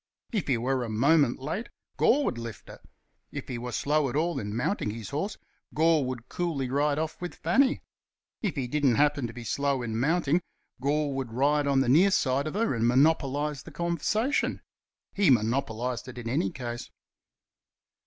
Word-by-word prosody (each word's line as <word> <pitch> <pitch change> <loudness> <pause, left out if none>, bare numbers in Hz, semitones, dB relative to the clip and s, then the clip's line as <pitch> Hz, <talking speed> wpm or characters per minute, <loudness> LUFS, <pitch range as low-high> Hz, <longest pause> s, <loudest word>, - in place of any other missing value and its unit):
If 210 -7 -1
he 130 -4 +2
were 130 +2 0
a 115 - -4
moment 140 +4 +3
late, 165 - -4 0.3
Gore 285 +3 +3
would 120 - -1
lift 115 -3 -8
her. - - -11 0.5
If - - -6
he 125 -3 -4
were 125 +1 -5
slow 145 +2 +1
at 120 - -5
all 160 -1 0
in 105 -2 -4
mounting 125 - -1
his 110 -2 -6
horse, 175 +9 -2 0.4
Gore 160 -1 +4
would 125 -1 -5
coolly 145 -8 -2
ride 145 +1 +1
off 160 +2 -3
with 175 - -5
Fanny. 270 0 +2 0.6
If 205 -6 -1
he 135 -4 -2
didn't 140 -2 +2
happen 145 -2 +2
to 115 - -9
be 120 - -8
slow 140 +2 0
in 110 -1 -2
mounting, 165 +4 +2 0.4
Gore 145 +1 +1
would 135 -3 -4
ride 145 +3 +2
on 135 -1 +3
the 135 - 0
near 165 +10 +6
side 140 -6 +1
of 155 - -5
her 230 -4 +1
and 115 -1 +1
monopolize 145 +1 +2
the - - -11
conversation. 190 - 0 0.5
He 200 -5 +3
monopolized 120 0 0
it 130 -1 -9
in 120 -1 -6
any 115 -5 +1
case. 120 +1 -6
140 Hz, 185 wpm, -28 LUFS, 120-160 Hz, 0.6 s, near